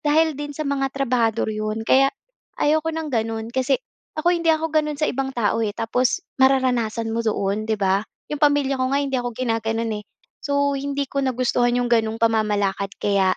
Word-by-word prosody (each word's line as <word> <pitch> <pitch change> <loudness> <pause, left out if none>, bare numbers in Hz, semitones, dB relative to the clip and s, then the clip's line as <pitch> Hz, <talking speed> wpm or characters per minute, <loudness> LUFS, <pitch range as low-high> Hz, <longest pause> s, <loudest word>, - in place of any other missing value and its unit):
dahil 315 +2 +3
din 290 0 -6
sa 310 - -3
mga 280 -1 0
trabahador 235 -5 +1
'yon. 215 +1 -3
Kaya, 270 +4 +5 0.5
ayaw 310 +2 +3
ko 320 - -3
ng 320 -2 -4
gano’n, 225 -1 -1
kasi 260 +1 +2 0.4
ako, 340 +3 +2
hindi 335 -1 0
ako 315 0 -1
gano’n 300 -1 +1
sa 305 - 0
ibang 270 +1 -1
tao, 225 -1 +1
eh, 215 -2 0
tapos 245 +8 0 0.2
mararanasan 245 -4 +2
mo 230 - 0
doon, 215 -1 -1
‘di 220 - +1
ba? 195 -1 +2 0.3
‘Yong 295 - -3
pamilya 285 -2 +2
ko - - +2
nga, 280 - +3
hindi 270 -1 -1
ako 245 - -3
ginagano’n, 225 -2 -1
eh. - - -16 0.4
So, 285 0 +1
hindi 280 0 -2
ko 275 +1 -2
nagustuhan 245 -2 +1
‘yong 245 0 0
gano’ng 225 -1 +2
pamamalakad. 205 -3 +1
Kaya 195 -2 +2
250 Hz, 190 wpm, -22 LUFS, 225-280 Hz, 0.5 s, Kaya